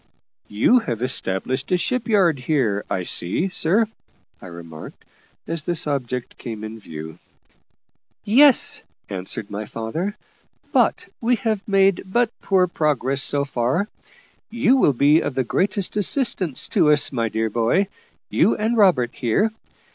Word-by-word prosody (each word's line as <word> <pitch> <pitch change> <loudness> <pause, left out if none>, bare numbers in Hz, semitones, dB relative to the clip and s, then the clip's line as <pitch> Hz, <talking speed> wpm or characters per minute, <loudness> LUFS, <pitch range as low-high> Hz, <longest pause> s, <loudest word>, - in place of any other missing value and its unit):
"You 110 - +3
have 120 - -4
established 130 - -2
a 180 - +4
ship 250 +6 -1
yard 185 - +3
here, 125 -7 0
I 90 - -1
see, 95 - 0
sir," 190 +5 +2 0.6
I - - -10
remarked, 85 -2 -11 0.4
as 165 -1 -3
this 170 0 -1
object 125 -4 -4
came 110 -3 -7
in 110 +1 -7
view. 80 -3 -9 1.0
"Yes," 265 +5 +4 0.3
answered 100 +3 -5
my 105 +1 -5
father; 160 - -4 0.6
"but - - +2 0.2
we 245 +2 +2
have 215 -1 -2
made 195 -2 +3
but 235 +4 +1
poor 190 -2 +3
progress, 140 -5 0
so 140 0 +2
far. 135 - -1 0.6
You 235 +3 +2
will 150 - +3
be 145 +5 +4
of 135 - -4
the 130 - +1
greatest 195 - -1
assistance 200 - 0
to 150 - +3
us, 145 -1 +3
my 115 -4 -1
dear 110 0 -2
boy 120 - +2 0.5
you - - +3
and 220 +3 0
Robert 180 - +3
here. 160 - 0
145 Hz, 140 wpm, -21 LUFS, -, 1.0 s, a